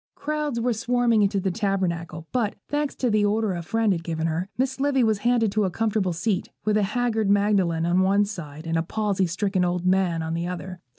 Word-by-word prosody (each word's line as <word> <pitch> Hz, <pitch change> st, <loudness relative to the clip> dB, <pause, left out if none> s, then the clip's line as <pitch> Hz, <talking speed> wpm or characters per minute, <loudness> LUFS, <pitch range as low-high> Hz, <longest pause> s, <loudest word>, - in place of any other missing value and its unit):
Crowds 300 Hz, -4 st, -2 dB
were 240 Hz, +1 st, +1 dB
swarming 235 Hz, 0 st, +2 dB
into 200 Hz, 0 st, +2 dB
the 190 Hz, 0 st, -1 dB
Tabernacle: 175 Hz, -6 st, -2 dB
but, 230 Hz, -5 st, 0 dB
thanks 290 Hz, -1 st, -1 dB
to 250 Hz, -3 st, 0 dB
the 210 Hz, -1 st, +3 dB
order 210 Hz, -1 st, +1 dB
a 175 Hz, -, -3 dB
friend 220 Hz, +4 st, +1 dB
had 165 Hz, -2 st, -4 dB
given 160 Hz, -1 st, -2 dB
her, 165 Hz, +4 st, -2 dB
Miss 265 Hz, +1 st, -1 dB
Livy 270 Hz, -2 st, +2 dB
was 220 Hz, -3 st, +2 dB
handed 235 Hz, -2 st, +2 dB
to 215 Hz, +1 st, +1 dB
a 190 Hz, -, +1 dB
comfortable 210 Hz, -1 st, 0 dB
seat, 185 Hz, +4 st, -1 dB, 0.2 s
with 215 Hz, -1 st, +2 dB
a 215 Hz, -, +3 dB
haggard 220 Hz, 0 st, 0 dB
Magdalen 200 Hz, -5 st, +2 dB
on 175 Hz, +2 st, +2 dB
one 200 Hz, +2 st, +3 dB
side 160 Hz, -6 st, -8 dB
and 165 Hz, 0 st, 0 dB
a -, -, +2 dB
palsy 195 Hz, +1 st, 0 dB
stricken 190 Hz, +2 st, 0 dB
old 180 Hz, 0 st, -1 dB
man 185 Hz, -3 st, +2 dB
on 160 Hz, 0 st, -3 dB
the 170 Hz, +1 st, -2 dB
other. 180 Hz, 0 st, -6 dB
200 Hz, 220 wpm, -24 LUFS, 175-225 Hz, 0.2 s, the